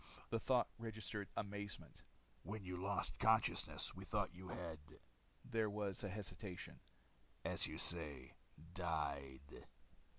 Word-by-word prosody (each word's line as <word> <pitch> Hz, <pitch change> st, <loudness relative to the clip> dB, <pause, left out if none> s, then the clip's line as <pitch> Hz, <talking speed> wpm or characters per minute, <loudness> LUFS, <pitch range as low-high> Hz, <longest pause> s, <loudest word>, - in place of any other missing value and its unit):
The 115 Hz, -, +2 dB
thought 125 Hz, +1 st, +4 dB
registered 110 Hz, -3 st, -3 dB
amazement. 100 Hz, -2 st, -4 dB, 0.4 s
"When 105 Hz, +1 st, -5 dB
you 90 Hz, -1 st, -3 dB
lost 100 Hz, +2 st, +1 dB
consciousness, -, -, +4 dB
we -, -, -7 dB
thought -, -, 0 dB
you 90 Hz, +1 st, -8 dB
had" 85 Hz, -3 st, -4 dB, 0.7 s
there 110 Hz, -2 st, +2 dB
was 100 Hz, -2 st, -2 dB
a 100 Hz, -, -1 dB
hesitation 95 Hz, -1 st, -5 dB, 0.7 s
"as -, -, +5 dB
you -, -, -5 dB
say, 75 Hz, -7 st, +3 dB, 0.4 s
died." 70 Hz, -6 st, -2 dB
95 Hz, 120 wpm, -42 LUFS, 85-105 Hz, 0.7 s, as